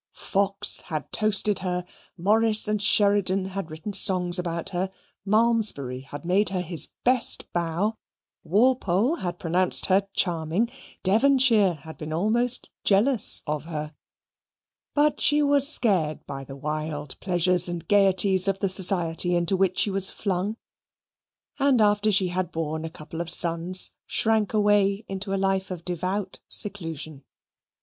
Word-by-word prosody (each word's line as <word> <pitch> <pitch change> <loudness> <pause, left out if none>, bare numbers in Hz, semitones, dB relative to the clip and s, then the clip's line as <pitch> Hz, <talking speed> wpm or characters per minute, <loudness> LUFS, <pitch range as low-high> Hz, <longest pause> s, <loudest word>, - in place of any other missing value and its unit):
Fox 195 0 0
had 155 -3 -6
toasted 210 -1 +2
her. 180 -1 -4 0.3
Morris 215 +4 +4
and 210 -1 -1
Sheridan 200 -2 +2
had 195 -3 -6
written 160 +7 -8
songs 185 -2 +4
about 170 -2 -4
her. 185 +1 -3 0.4
Malmesbury 215 - 0
had 140 +4 -11
made 190 +4 +1
her 185 -1 -3
his 170 -2 0 0.2
best 250 -1 +2
bow; 175 +6 -2 0.4
Walpole 230 - +1
had 175 - -5
pronounced 180 +2 +1
her 195 +1 +1
charming; 175 +6 -1 0.3
Devonshire 225 -2 +3
had 160 +2 -13
been 155 0 -7
almost 225 +9 -1
jealous 215 +4 +2
of 150 0 -4
her; 155 -2 -6 1.0
but 295 +1 +1
she 295 0 +3
was 285 -1 +5
scared 185 - 0
by 135 0 -8
the 135 - -10
wild 150 0 -5
pleasures 180 -1 +2
and 170 -2 -7
gaieties 195 -1 +2
of 195 -1 0
the 195 0 -2
society 175 -2 +1
into 175 +2 0
which 185 -1 0
she 205 - +1
was 195 0 +1
flung, 200 +2 -3 1.0
and 275 -3 +2
after 210 0 +2
she 190 -2 +1
had 180 -1 -3
borne 160 0 -4
a - - -5
couple 160 +1 -9
of 170 - -5
sons, 170 +2 +4 0.2
shrank 220 -3 0
away 205 -1 +1
into 195 +1 -6
a 195 - -1
life 195 0 -1
of 180 -3 -8
devout 185 +2 -4
seclusion. 165 -8 +1
190 Hz, 140 wpm, -24 LUFS, 170-210 Hz, 1.0 s, was